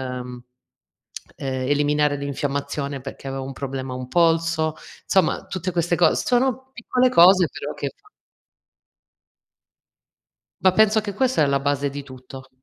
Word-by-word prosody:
ehm, 125 -1 -6 0.9
eliminare 145 +2 0
l'infiammazione 140 0 -3
perché 135 0 -8
aveva 135 0 -4
un 135 +1 -6
problema 135 -1 -5
a - - -4
un 130 0 -7
polso; 165 -1 +2 0.3
somma 190 - +1
tutte 185 -1 -4
queste 175 0 0
cos 165 -3 +3
sono 260 +1 0
piccole 250 +1 +1
cose, 180 -3 +6
però - - -6
che - - -4
fa 420 +1 -25 2.5
Ma 185 -1 +5
penso 220 +2 +4
anche 205 -2 -3
questa 260 -2 +1
è - - +3
la 140 0 +1
base 140 0 -1
di 140 +1 -6
tutto. 130 0 -12
145 Hz, 140 wpm, -22 LUFS, 135-185 Hz, 2.5 s, cose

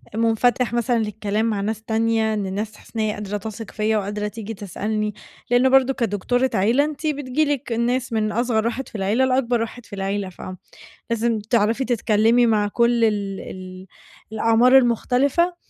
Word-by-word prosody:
مُنفَتح 230 +2 +1
مثلًا 240 0 +1
للكلام 215 0 -1
مع 215 -3 -1
ناس 220 +1 -3
تانية، 225 0 +1
إن 205 -2 -2
الناس 205 +3 -4
حاسّة - - -18
إن - - -2
هي 215 -1 0
قادرة 210 0 -4
تَثِق 215 0 -9
فيّا، 215 0 0
وقادرة 210 +1 -3
تيجي 220 +1 -6
تسألني. 210 +1 -3 0.4
لإن 245 +2 +4
برضه 270 0 +4
كدكتورة 245 +2 0
عيلة، 230 +8 +3
أنتِ 305 0 -4
بتييجي 290 0 0
لِك 285 -3 -2
ناس 240 +2 0
من 215 -1 0
أصغر 230 -1 0
واحد 245 +3 -2
في - - -15
العيلة، 210 +6 +1
لأكبر 250 -2 +1
واحد 230 +1 -6
في - - -16
العيلة. 195 0 -2
ف 180 - -14 0.7
لازم 230 -1 0
تعرفي 225 +3 +1
تتكلّمي 230 0 +3
مع 215 -3 +2
كُل 235 +2 +2
ال 200 -3 0
ال 185 0 -9 0.5
الأعمار 230 +4 +4
المختلفة. 265 +7 +2
225 Hz, 170 wpm, -22 LUFS, 210-245 Hz, 0.7 s, لإن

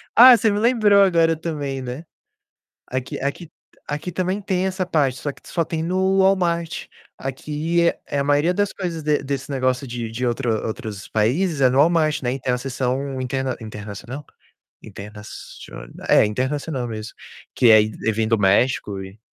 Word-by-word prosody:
Ah, 245 +1 +10
você 220 -2 +2
me 205 - 0
lembrou 215 -4 +4
agora 165 -4 +4
também, 145 -5 -4
né. 130 +6 -6 0.8
Aqui 130 0 -4
aqui 145 +4 -4 0.4
aqui 150 +4 -4
também 185 +3 -1
tem 190 -2 -1
essa 185 -1 -2
parte, 140 -6 +1
só 145 - -3
que - - -21
só 165 - 0
tem 160 0 -3
no 190 +3 +1
Walmart. 175 -3 +1 0.3
Aqui 150 +5 -2
é - - -3
é 140 - -3
a 140 - +1
maioria 145 +5 +2
das 205 0 0
coisas 170 -4 -4
de 150 -1 +1
desse 135 0 -4
negócio 130 0 0
de 120 -2 -5
de 120 +3 -4
outro 120 +1 -1 0.2
outros 110 -3 -6
países 140 - +1
é 130 - +6
no 130 - +1
Walmart, 155 -1 +3
né, 125 +2 -1
tem 125 -1 -1
a 125 - 0
seção 130 +1 -2
interna 130 0 -2
internacional? 110 +6 -8 0.6
Internacion 105 - -10 0.2
é, - - +6
internacional 130 +3 -2
mesmo, 110 -1 -7 0.4
que 120 -3 +5
é 110 -1 +8
eh, 110 +1 -2
vem 110 +1 -1
do 115 -1 +2
México 100 0 +2
e 95 +3 -11
140 Hz, 170 wpm, -22 LUFS, 125-170 Hz, 0.8 s, Ah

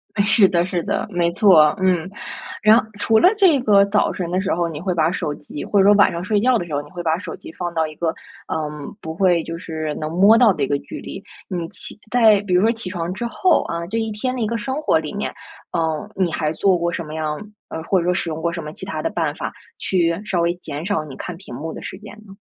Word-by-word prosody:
哎， 205 - +3
是 205 -1 +5
的 175 -2 +2
是 175 -2 -2
的， - - -2
没 175 -3 +1
错， 170 -6 +5
嗯。 180 -2 +1 0.5
然 215 +2 +7 0.2
除 220 +1 +3
了 - - +6
这 360 -9 +5
个 205 -4 +5
早 200 +1 +1
晨 175 -2 -4
的 180 +1 0
时 190 +1 0
候， 170 0 0
你 155 -2 -6
会 185 +2 -1
把 165 -1 +2
手 150 -5 -2
机 145 0 -8
或 205 - +2
者 - - +6
说 205 - +7
晚 205 - +5
上 170 +1 -4
睡 205 +2 +1
觉 250 +4 +3
的 175 - -3
时 165 - -8
候， 145 - 0
你 145 - -15
会 175 - -6
把 160 -1 +1
手 185 - -7
机 - - -11
放 175 0 -5
到 160 -1 +1
一 155 - -10
个， 165 0 -1 0.3
嗯， 150 +1 -4
不 160 - -5
会 175 -2 +3
就 165 +1 -6
是 155 -2 -4
能 155 - -4
摸 200 +6 +6
到 230 -4 +6
的 150 - -2
一 - - +1
个 145 - +1
距 - - -9
离。 - - -7 0.3
你 175 -2 -3
起 200 - -9
在 225 -4 +6
比 200 -3 -3
如 180 - +5
说 225 +3 +4
起 225 -5 -5
床 175 -2 -3
之 240 +5 -4
后 360 +9 +2
啊， 170 0 -4
这 220 +5 -3
1 225 -1 -2
天 255 +5 -2
的 - - -4
一 225 - +1
个 230 - -2
生 260 +6 -3
活 - - +3
里 - - -6
面， - - -3 0.4
嗯， 160 0 -1
你 185 -3 +1
还 155 -1 -1
做 190 +2 +3
过 170 0 -1
什 170 - -3
么 155 +1 -7
样， 155 -1 -2 0.3
呃 160 - -5
或 190 +3 +2
者 170 - -2
说 180 - +2
使 175 - -2
用 155 0 -4
过 170 +1 -1
什 170 -1 -5
么 150 - -6
其 - - -8
他 - - -4
的 - - -1
办 - - -1
法 - - -4 0.3
去 170 -1 +1
稍 185 -4 0
微 170 0 +2
减 160 -3 -7
少 200 -5 0
你 140 -3 -10
看 180 - -6
屏 190 -8 -11
幕 160 +5 -5
的 - - -8
时 - - -7
间 210 +1 -11
呢？ 195 - -12
175 Hz, 295 characters per minute, -21 LUFS, 160-205 Hz, 0.5 s, 然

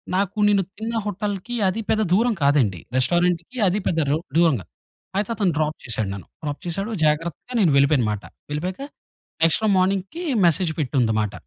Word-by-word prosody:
నాకు 200 +2 -1
నేను 200 -2 +3
తిన్న 225 +1 -4
హోటల్‌కి 205 +3 -3
అది 210 +4 -1
పెద్ద 220 0 +2
దూరం 230 +4 +3
కాదండి. 125 - +3 0.2
రెస్టారెంట్‌కి 175 - +1
అది 195 +4 +1
పెద్ద 165 - +1
రొ 150 - +2 0.2
దూరం 165 -3 +5
కాదు. - - -18 0.5
అయితే 205 +2 0
అతను 195 -5 +1
డ్రాప్ 155 0 0
చేసాడు 110 -5 0
నన్ను. 95 -5 -9
డ్రాప్ 145 -1 -4
చేసాడు 195 +6 -3
జాగ్రత్తగా 165 - -1
నేను 175 -7 +4
వెళ్ళిపోయను 140 -3 +4
మాట. 105 - -4 0.3
వెళ్ళిపోయాక 180 - -3 0.6
నెక్స్ట్ 165 +6 +3
రోజు 210 -2 +3
మార్నింగ్‌కి 195 - 0 0.2
మెసేజ్ 170 0 +2
పెట్టుంది 135 -3 +1
అన్నమాట. 105 -2 -1
175 Hz, 165 wpm, -23 LUFS, 145-200 Hz, 0.6 s, దూరం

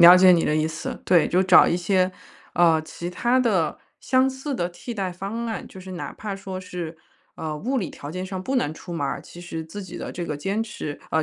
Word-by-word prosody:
了 175 +1 +11
解 185 0 +8
你 170 -2 +4
的 150 - +2
意 155 0 +2
思， 160 0 -5
对， 175 -3 +5
就 180 +2 +3
找 185 -1 +8
一 170 - +2
些， 185 +1 +2 0.4
呃， 165 -2 +5
其 170 +2 -6
它 240 +7 +2
的、 205 -11 +2 0.2
相 260 0 +3
似 265 +2 -4
的 175 -7 0
替 205 +7 -7
代 190 -4 -2
方 200 +6 -4
案。 225 - -4
就 - - -12
是 185 0 -8
哪 175 - -5
怕 210 -2 -4
说 195 -1 -6
是， 175 -3 -6 0.4
呃， 155 -1 -4
物 255 - -1
理 200 -9 -1
条 145 - -8
件 185 +2 -4
上 190 -1 -5
不 265 +8 -1
能 155 -11 +1
出 175 +3 -9
门 145 -4 -1
儿， 135 - -2
其 175 - -12
实 165 -2 -5
自 200 +6 -7
己 185 - -8
的 - - -5
这 175 - -4
个 150 - -3
坚 195 +8 -1
持 150 -9 -5
呃， 160 - +3
185 Hz, 260 characters per minute, -24 LUFS, 170-205 Hz, 0.4 s, 了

